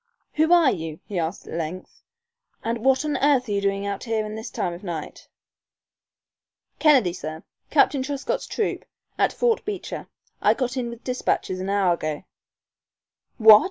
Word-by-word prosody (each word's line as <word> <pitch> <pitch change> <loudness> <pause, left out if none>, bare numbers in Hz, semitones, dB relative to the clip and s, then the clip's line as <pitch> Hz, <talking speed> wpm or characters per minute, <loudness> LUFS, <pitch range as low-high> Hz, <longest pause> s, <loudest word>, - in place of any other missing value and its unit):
"Who 315 +2 +2
are 340 -6 +6
you?" 160 -2 -5
he 195 -4 -3
asked, 165 +3 -3
at - - -8
length, 170 +3 -5 0.6
"and 230 +1 -1
what 265 +2 +3
on 295 -2 0
earth 270 -2 +3
are - - -4
you 200 -1 +1
doing 200 0 0
out 200 +3 -3
here 220 -2 -1
this 220 +1 -6
time 175 - -2
of 175 - -10
night?" 170 -5 -6 1.5
"Kennedy, 265 - +5
sir. 160 -2 -6 0.3
Captain 275 - +4
Truscott's 275 +1 -3
troop, 435 - -2 0.4
at - - +3
Fort 470 -2 +1
Beecher. 410 -3 -5 0.3
I - - +4
got 255 -1 -2
in 245 -2 -2
with 235 0 -10
despatches 250 -7 -1
an 190 +1 -3
hour 195 -3 +3
ago 155 -2 -3 0.5
" - - -56
"What!" 220 -2 +9
220 Hz, 165 wpm, -24 LUFS, 180-265 Hz, 1.5 s, What